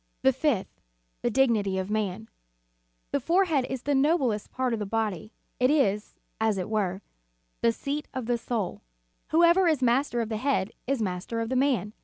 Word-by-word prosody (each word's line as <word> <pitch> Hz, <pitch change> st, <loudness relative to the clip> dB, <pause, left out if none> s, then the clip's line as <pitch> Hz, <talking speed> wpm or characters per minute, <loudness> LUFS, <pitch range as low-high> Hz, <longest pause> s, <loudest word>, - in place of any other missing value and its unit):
"* -, -, -46 dB
The 265 Hz, 0 st, +5 dB
fifth, 265 Hz, -6 st, -1 dB, 0.4 s
the 240 Hz, -, +1 dB
dignity 225 Hz, -6 st, +2 dB
of 190 Hz, +2 st, -3 dB
man.. 215 Hz, 0 st, -2 dB, 0.8 s
The -, -, +1 dB
fore 370 Hz, +3 st, +3 dB
head 285 Hz, -7 st, +1 dB
is 260 Hz, -2 st, -4 dB
the 290 Hz, -, 0 dB
noblest 270 Hz, -6 st, +2 dB
part 255 Hz, -2 st, -1 dB
of 225 Hz, -, -1 dB
the 210 Hz, -, -2 dB
body; 215 Hz, -2 st, -2 dB, 0.3 s
it 250 Hz, +1 st, +4 dB
is, 210 Hz, -9 st, +1 dB, 0.2 s
as 220 Hz, -2 st, +1 dB
it 190 Hz, +3 st, -4 dB
were, 195 Hz, -3 st, -1 dB, 0.6 s
the 230 Hz, -, +4 dB
seat 285 Hz, +5 st, -4 dB
of 260 Hz, -3 st, -4 dB
the 240 Hz, 0 st, 0 dB
soul. 220 Hz, -6 st, -3 dB, 0.5 s
Whoever 340 Hz, +3 st, +5 dB
is 305 Hz, -5 st, +2 dB
master 245 Hz, +1 st, +2 dB
of 225 Hz, -2 st, -1 dB
the 220 Hz, -, -2 dB
head 215 Hz, -6 st, 0 dB, 0.2 s
is 265 Hz, -4 st, 0 dB
master 185 Hz, +4 st, -3 dB
of 225 Hz, 0 st, -2 dB
the 260 Hz, -, -1 dB
man. 250 Hz, -7 st, +1 dB
235 Hz, 190 wpm, -27 LUFS, 210-275 Hz, 0.8 s, The